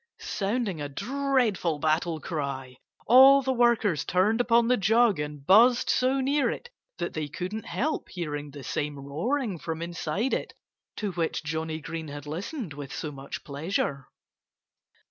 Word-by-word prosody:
Sounding 200 -4 -2
a 145 - -4
dreadful 235 - 0
battle 160 +2 0
cry, 135 -5 -4 0.3
all 270 +3 +8
the 265 0 +1
workers 235 - +2
turned 210 +6 +2
upon 235 -1 +3
the 250 - +4
jug 225 -2 +3
and 150 -1 -5
buzzed 235 - +6
so 260 +2 +2
near 275 +2 +2
it 480 - -6 0.3
that - - -3
they 155 -1 -3
couldn't 185 +9 -5
help 310 +4 -2
hearing 150 -4 -4
the 140 -1 -10
same 145 +1 -3
roaring 185 - -2
from 160 0 -4
inside 170 +7 -2
it - - -3 0.4
to 210 -3 -3
which 165 -2 -2
Johnnie 160 +1 -3
Green 160 +1 -5
had 145 0 -8
listened 180 - -5
with 140 -2 -8
so 155 - -4
much 135 -1 -8
pleasure. 140 -2 -2
175 Hz, 150 wpm, -27 LUFS, 150-235 Hz, 0.4 s, all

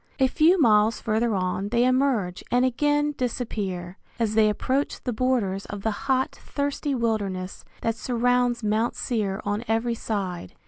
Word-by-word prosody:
A 265 - +4
few 330 +7 +4
miles 220 -4 +4
further 225 0 0
on 185 +1 -1
they 235 +3 +3
emerge 255 -8 +1
and 245 +1 +3
again 295 +3 +1
disappear, 200 -7 -3 0.2
as 225 -3 0
they 215 -1 +4
approach 265 +7 -1
the 250 - -2
borders 215 -5 0
of 200 -1 -7
the 220 - +1 0.2
hot, 260 0 +2
thirsty 285 0 -2
wilderness 200 -6 -2 0.2
that 230 - +1
surrounds 245 +1 +1
Mount 215 +3 +1
Seir 210 -5 -2
on 205 +2 -1
every 225 +2 +1
side. 195 - -4
230 Hz, 150 wpm, -25 LUFS, 205-255 Hz, 0.2 s, A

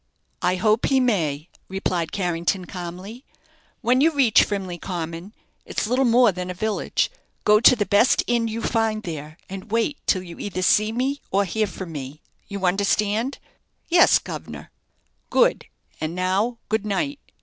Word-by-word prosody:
"I 180 - +2
hope 215 +4 +2
he 270 - +3
may," 165 - 0 0.2
replied 185 -3 -2
Carrington, 175 0 -1
calmly. 185 +7 -8 0.6
"When 250 +2 +3
you 320 - +6
reach 270 -7 +5
Frimley 190 -4 -4
Common 170 +1 -5 0.3
it's - - -3
little 250 +4 +2
more 240 -1 +5
than 180 0 -5
a 180 - -4
village 215 - -1 0.3
go 210 0 +5
to 240 - +7
the 210 -3 -1
best 205 +6 +4
inn 235 -1 +1
you 225 +1 -4
find 220 -1 0
there, 155 -3 -7
and 195 +2 -8
wait 230 +6 0
till 185 -2 +2
you 170 -2 -11
either 185 -2 -3
see 215 +3 +3
me, 265 +5 -1
or 200 +1 +2
hear 215 +4 0
from 185 -2 -8
me. 145 -1 -7 0.3
You 200 -2 -4
understand?" 205 +6 +1 0.5
"Yes, 345 0 +6
guv'nor." - - -8 0.6
"Good; - - +2 0.4
and 160 +2 -3
now, 190 +6 0
good 220 0 0
night." 270 +8 -2
205 Hz, 160 wpm, -23 LUFS, 180-230 Hz, 0.6 s, to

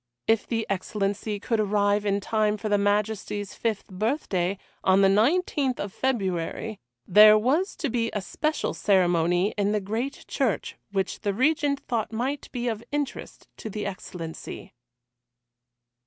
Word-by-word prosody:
If 225 -1 +2
the 225 -2 -1
Excellency 200 +2 -2
could 225 +2 -1
arrive 205 0 +2
in 200 0 +1
time 215 0 +1
for 215 +1 -4
the 205 - +3
Majesty's 205 0 -1
fifth 225 -4 -2
birthday, 195 - -1 0.3
on 190 +1 +5
the 195 - +6
19th 265 - +2
of 200 -1 -4
February, 205 -3 -2 0.3
there 215 +3 +8
was 290 - +1
to 310 - -2
be 230 -2 0
a 210 - -2
special 305 - -2
ceremony 180 -1 +2
in 205 +1 +2
the 210 - +2
great 225 +8 -4
church - - -1 0.2
which 195 -1 -1
the 200 -1 -1
Regent 285 +2 +2
thought 230 -3 -2
might 260 +6 -3
be 245 -1 -3
of 225 -1 -2
interest 290 -2 -4
to 220 - -6
the 210 0 -4
Excellency. 175 -4 -7
210 Hz, 145 wpm, -26 LUFS, 195-240 Hz, 0.3 s, there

